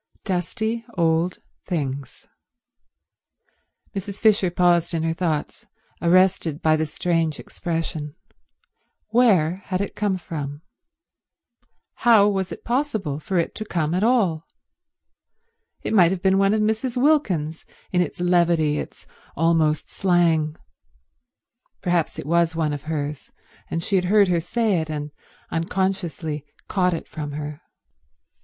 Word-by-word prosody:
Dusty 220 +5 -2
old 165 +1 +2 0.3
things. 140 -6 -4 1.7
Mrs. 200 +1 -5
Fisher 210 -4 +3
paused 175 -1 +2
in 160 - -1
her 165 0 0
thoughts, 165 -4 -3 0.3
arrested 175 -3 +3
by 155 -2 +3
the 155 0 -1
strange 165 -1 -1
expression. 160 -3 -4 0.9
Where 195 -8 +4
had 185 -1 -2
it 200 - -3
come 205 -3 0
from? 150 -4 -6 1.3
How 225 -4 +6
was 195 -2 -1
it - - -8
possible 220 - -1
for 185 +4 -2
it 170 - 0
to 215 - -5
come 170 -6 -1
at 180 - +1
all? 200 -10 +2 1.4
It - - -2
might 180 -6 +6
have 180 -1 -3
been 190 0 +4
one 195 +2 +3
of 215 - +1
Mrs. 220 +4 0
Wilkins's, 190 - +1 0.3
in 180 - +3
its 175 - -3
levity, 170 -4 +2
its - - -8 0.3
almost 160 -1 +2
slang. 165 -5 +2 1.3
Perhaps 175 -3 0
it - - -6
was 170 +1 +2
one 155 -2 0
of 145 +1 -6
hers, 150 -2 -4 0.4
and 165 - -2
she 195 - +1
had 180 - +1
heard 200 +1 +4
her 175 -1 +2
say 200 +1 0
it 160 - -6
and 150 -1 -4 0.4
unconsciously 165 -3 -2 0.2
caught 180 -3 +1
it - - -7
from 150 -2 -6
her. 150 0 -6
175 Hz, 130 wpm, -23 LUFS, 155-195 Hz, 1.7 s, How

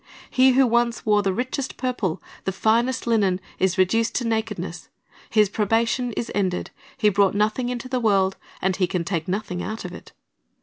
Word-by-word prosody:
He 260 0 +5
who 265 +1 +5
once 235 -1 +1
wore 210 -1 +4
the 195 -1 0
richest 255 +5 -3
purple, 240 -10 -2 0.2
the 190 - 0
finest 235 +6 +1
linen, 205 -6 +2 0.2
is 190 0 +1
reduced 225 +5 +2
to 245 - 0
nakedness. 210 -6 -3 0.4
His 215 -1 +4
probation 225 +4 0
is 230 - -3
ended. 185 -3 -1 0.3
He 215 -5 +4
brought 200 -1 +3
nothing 215 +4 +1
into 250 0 -4
the 255 -1 -1
world, 195 -4 +2 0.3
and 190 0 +2
he 185 -2 +2
can 175 -1 -1
take 165 -3 -2
nothing 185 -2 -3
out 220 +4 -5
of - - -6
it. - - -11
215 Hz, 180 wpm, -23 LUFS, 190-240 Hz, 0.4 s, He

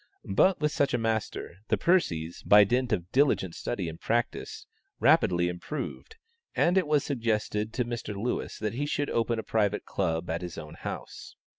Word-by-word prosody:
But 185 - +4
with 150 -1 +1
such 140 -4 +1
a - - +2
master, 110 -6 -2
the - - +2
Percies, 85 - +1
by 105 0 +8
dint 125 +4 0
of 90 -3 -1
diligent 130 - +2
study 95 -2 -3
and 80 0 -7
practice, 420 - -2 0.3
rapidly 90 - +4
improved, 150 - -5 0.4
and 175 - +3
it 190 -4 +3
was 150 -2 +3
suggested 110 -4 -1
to 125 - 0
Mr. 120 -3 -4
Lewis 110 +5 -3
that 105 0 -2
he 145 +5 -2
should 145 -1 -1
open 115 0 +1
a 110 - -3
private 105 -2 0
club 85 -3 -1
at 85 +2 -2
his 90 -2 -6
own 75 -1 -8
house. - - -7
110 Hz, 175 wpm, -28 LUFS, 90-140 Hz, 0.4 s, by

